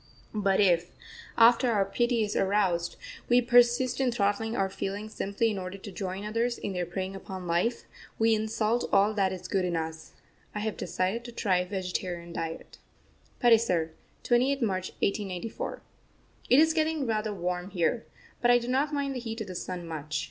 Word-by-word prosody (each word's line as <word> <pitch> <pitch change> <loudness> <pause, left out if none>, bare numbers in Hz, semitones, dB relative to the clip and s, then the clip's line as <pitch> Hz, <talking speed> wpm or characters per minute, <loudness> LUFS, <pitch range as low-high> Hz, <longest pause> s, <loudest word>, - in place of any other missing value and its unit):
But 200 -3 +1
if, 175 -3 +3 0.5
after 235 +2 +6
our 200 -3 +2
pity 240 +3 +1
is 210 0 -3
aroused, 190 -3 +1 0.3
we 245 0 +6
persist 245 +1 +4
in 255 -2 +2
throttling 220 +1 0
our 195 - +1
feelings 200 +3 -5
simply 205 +3 0
in 200 - -3
order 185 +1 -6
to 200 +1 -9
join 190 +1 -4
others 230 +3 0
in 200 - -4
their 180 -1 -2
preying 190 +2 -4
upon 190 -1 -7
life, 175 +8 0 0.3
we 225 0 +4
insult 220 +1 0
all 205 +2 +4
that 195 -3 +1
is 185 -1 -6
good 190 -1 0
in 175 -1 -1
us. 160 0 -5 0.4
I 210 - -2
have 215 -1 -2
decided 190 +6 -2
to 240 - -7
try 200 -5 +1
a 180 0 -1
vegetarian 180 -2 -4
diet. 165 0 -6 0.6
PATISAR, 220 -9 +4 0.3
28th 260 +3 +2
March 185 -4 -1
1894. 200 +1 -3 0.7
It 255 - +6
is 320 +2 +5
getting 315 -2 0
rather 215 -2 -1
warm 180 -1 -3
here, 195 +5 0 0.3
but 240 - +3
I 245 - +7
do 240 0 -4
not 275 +4 +1
mind 280 -2 -1
the 255 - -3
heat 225 -1 -5
of - - -3
the - - -5
sun 180 0 -5
much. 155 -1 -4
205 Hz, 180 wpm, -28 LUFS, 185-235 Hz, 0.7 s, I